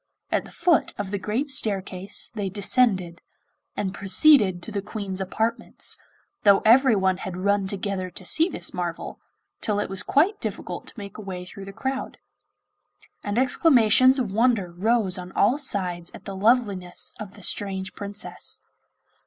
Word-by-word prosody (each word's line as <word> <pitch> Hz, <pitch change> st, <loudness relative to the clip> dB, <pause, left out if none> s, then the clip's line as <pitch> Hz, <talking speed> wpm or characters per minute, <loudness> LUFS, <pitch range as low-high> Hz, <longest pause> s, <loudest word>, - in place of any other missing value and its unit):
At -, -, 0 dB
the -, -, -13 dB
foot 340 Hz, -4 st, +2 dB
of 205 Hz, -2 st, -4 dB
the 200 Hz, -, -2 dB
great 225 Hz, +9 st, -2 dB
staircase 195 Hz, -5 st, 0 dB
they 205 Hz, -4 st, -3 dB
descended, 195 Hz, -3 st, 0 dB, 0.6 s
and 195 Hz, -2 st, -2 dB
proceeded 200 Hz, -, +4 dB
to -, -, -8 dB
the 205 Hz, -1 st, -2 dB
Queen's 200 Hz, -2 st, -5 dB
apartments, 220 Hz, +4 st, -1 dB, 0.5 s
though 200 Hz, -1 st, +5 dB
everyone 220 Hz, -6 st, +4 dB
had 185 Hz, -1 st, -6 dB
run 200 Hz, +1 st, +1 dB
together 195 Hz, -1 st, -3 dB
to 180 Hz, +1 st, -11 dB
see 320 Hz, -, +2 dB
this -, -, -2 dB
marvel, -, -, -5 dB, 0.4 s
till 205 Hz, -2 st, 0 dB
it 205 Hz, -, -3 dB
was 195 Hz, 0 st, -2 dB
quite 355 Hz, -, +2 dB
difficult -, -, -5 dB
to -, -, -12 dB
make 200 Hz, 0 st, -9 dB
a -, -, -6 dB
way 185 Hz, -3 st, -6 dB
through 195 Hz, +1 st, -10 dB
the 195 Hz, -, -8 dB
crowd; 265 Hz, +6 st, -4 dB, 1.1 s
and 205 Hz, +1 st, -3 dB
exclamations 255 Hz, -1 st, +5 dB
of 240 Hz, -7 st, -2 dB
wonder 220 Hz, -4 st, +1 dB
rose 195 Hz, 0 st, +1 dB
on 180 Hz, 0 st, -8 dB
all 240 Hz, +8 st, +2 dB
sides 180 Hz, -, 0 dB
at -, -, -13 dB
the 195 Hz, -, -6 dB
loveliness 200 Hz, -4 st, 0 dB
of 205 Hz, -2 st, -8 dB
the 205 Hz, -, -12 dB
strange 190 Hz, -1 st, 0 dB
Princess. 205 Hz, +1 st, -6 dB
200 Hz, 160 wpm, -24 LUFS, 190-230 Hz, 1.1 s, though